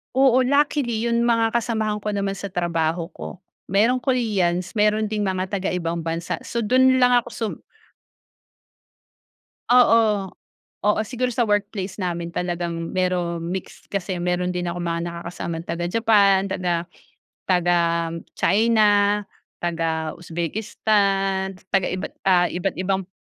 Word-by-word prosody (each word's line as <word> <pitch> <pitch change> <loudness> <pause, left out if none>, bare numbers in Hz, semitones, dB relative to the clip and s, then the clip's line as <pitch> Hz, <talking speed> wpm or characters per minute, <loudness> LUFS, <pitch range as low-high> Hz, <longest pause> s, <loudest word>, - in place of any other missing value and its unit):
Oo, 260 -1 +5
luckily 265 -4 +1
yung 235 0 +1
mga 230 -1 +2
kasamahan 220 -3 -1
ko 210 - -3
naman 200 -1 -1
sa 195 0 -6
trabaho 170 -1 -1
ko, - - -8 0.3
merong 225 +7 +3
Koreans, 200 -9 0
meron 215 0 +2
ding 210 0 -2
mga 190 -1 -2
taga 195 -1 -1
ibang 170 -1 -2
bansa. 165 +1 -3
So, 235 -1 -3
dun 260 +3 +4
lang 250 -1 +4
ako - - -11
sum 225 -2 -3 2.2
Oo. 225 -5 +4 0.5
Oo, 210 +1 +2
siguro 250 +2 -2
sa 245 0 0
workplace 205 -2 -2
namin 170 -2 -3
talagang 170 -1 -3
meron 180 -2 0
mixed 190 0 -7
kasi 195 -1 -2
meron 180 +1 -1
din 180 - -1
akong 175 0 -3
mga 170 0 -1
nakakasama 170 -1 -5
taga 170 +1 -2
Japan, 200 -3 +4
taga 175 -3 -2 0.6
taga 175 -1 +3 0.6
China, 210 0 +3 0.4
taga 160 -2 -1
Uzbekistan, 195 +2 -1 0.2
taga 195 -2 +2
iba't 185 - -4 0.2
ah, 180 -1 +4
iba't 180 +1 -2
ibang 190 0 -1
195 Hz, 130 wpm, -23 LUFS, 175-220 Hz, 2.2 s, Oo